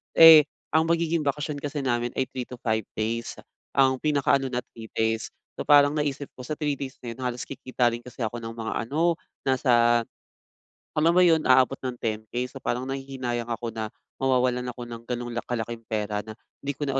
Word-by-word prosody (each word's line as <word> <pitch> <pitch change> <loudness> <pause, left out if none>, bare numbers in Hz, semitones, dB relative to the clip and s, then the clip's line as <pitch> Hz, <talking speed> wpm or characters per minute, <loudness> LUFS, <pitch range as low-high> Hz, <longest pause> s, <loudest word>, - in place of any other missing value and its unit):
Eh, 160 -2 +10 0.3
ang 160 +1 +3
magiging 165 -1 +1
bakasyon 145 +1 -1
kasi 145 0 -3
namin 120 -1 0
ay 130 - +2
3 125 -2 -5
to 125 - -8
5 110 -3 0
days. 115 +2 -2 0.4
Ang 130 -1 +4
pinaka-ano 140 -2 +2
na, 125 -1 -2
3 110 -1 -10
days. 110 0 0 0.3
So, - - -4
parang 145 -1 +7
naisip 145 -1 -2
ko 125 - -8
sa 155 - -3
3 150 -2 -1
days 135 -1 -6
na 120 - -5
'yon, 115 - -10
halos 125 0 -2
kikita 130 -2 0
rin 115 - -4
kasi 125 0 -10
ako 110 +2 -2
ng 115 0 -6
mga 115 -1 -3
ano, 165 +4 +1 0.3
nasa 120 -3 +3 0.9
alam 160 +2 +4
mo 180 - +6
'yon, 160 -3 +4
aabot 130 +1 +5
ng 125 - -2
10K. 110 +2 -2
So, - - -10
parang 125 +2 -1
nahihinayang 130 -3 -3
ako 115 0 -3
na 110 -1 -2 0.3
mawawalan 125 -1 +2
ako 120 0 -8
ng 115 -1 -8
gano'ng 120 -1 -3
la 120 - +1
kalaking 115 -1 -4
pera 105 -1 -1
na 110 - -8 0.3
'di 140 - -1
ko 145 - -3
na 135 - -1
125 Hz, 200 wpm, -26 LUFS, 120-145 Hz, 0.9 s, Eh